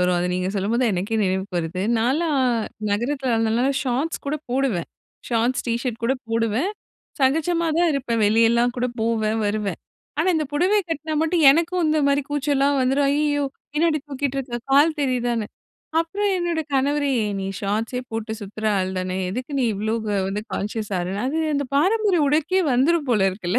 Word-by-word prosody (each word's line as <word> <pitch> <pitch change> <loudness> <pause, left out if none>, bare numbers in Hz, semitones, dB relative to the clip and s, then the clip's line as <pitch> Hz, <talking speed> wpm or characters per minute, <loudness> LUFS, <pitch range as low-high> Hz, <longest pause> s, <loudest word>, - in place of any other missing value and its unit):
வரும். 180 0 +2
அத 175 - 0
நீங்க 185 0 -1
சொல்லும்போது 210 +5 0
தான் 230 -5 +2
எனக்கே 200 +5 -1
நினைவுக்கு 190 0 -2
வருது. 170 +2 -3 0.2
நான்லாம் 285 +7 +1 0.5
நகரத்தில 250 +5 -1
இருந்தனால 225 +3 +1
ஷார்ட்ஸ் 270 +5 -2
கூட 290 +2 0
போடுவேன். 250 -10 0 0.4
ஷார்ட்ஸ் 240 +2 0
டீ 230 - +1
ஷர்ட் 240 -3 -4
கூட 260 +3 +2
போடுவேன். 230 - 0 0.5
சகஜமா 325 +5 +2
தான் 345 - +4
இருப்பேன் 240 -5 -1
வெளியெல்லாம் 230 +3 +3
கூட 250 0 0
போவேன், 220 -1 0
வருவேன். 205 -3 -2 0.4
ஆனா 330 +4 +2
இந்த 310 - 0
புடவை 370 +8 +3
கட்டினா 315 -1 -3
மட்டும் 325 0 +1
எனக்கும் 335 +4 +1
இந்த 310 0 +2
மாதிரி 280 +1 +2
கூச்சல்லலாம் 285 -1 +1
வந்துடும். 270 +2 +2
ஐய்யயோ! 290 -1 +1 0.3
பின்னாடி 310 0 +2
தூக்கிட்டு 275 -1 -2
இருக்கிற 245 -3 -4
கால் 300 +3 +4
தெரியுதான்னு 245 -5 0 0.5
அப்புறம் 400 +5 -1
என்னோட 345 -2 -1
கணவரே 285 +1 +1 0.3
"நீ - - -3
ஷார்ட்ஸே 215 +5 -2
போட்டு 225 0 -3
சுத்துற 205 +2 -8
ஆள் 185 0 0
தான, 185 0 -2
எதுக்கு 250 +8 -5
நீ 260 - +2
இவ்வளோ 215 +2 -2 0.4
வந்து 200 +2 -2
கான்ஷியஸ் 210 +1 -3
ஆகறன்னு" 185 +4 -3
அது 295 +5 -1 0.2
அந்த 285 0 0
பாரம்பரிய 380 +2 +3
உடைக்கே 315 +6 +2
வந்துடும் 290 +4 +2
போல 200 -5 +3
இருக்குல்ல. 185 -2 -1
255 Hz, 165 wpm, -23 LUFS, 220-300 Hz, 0.5 s, தான்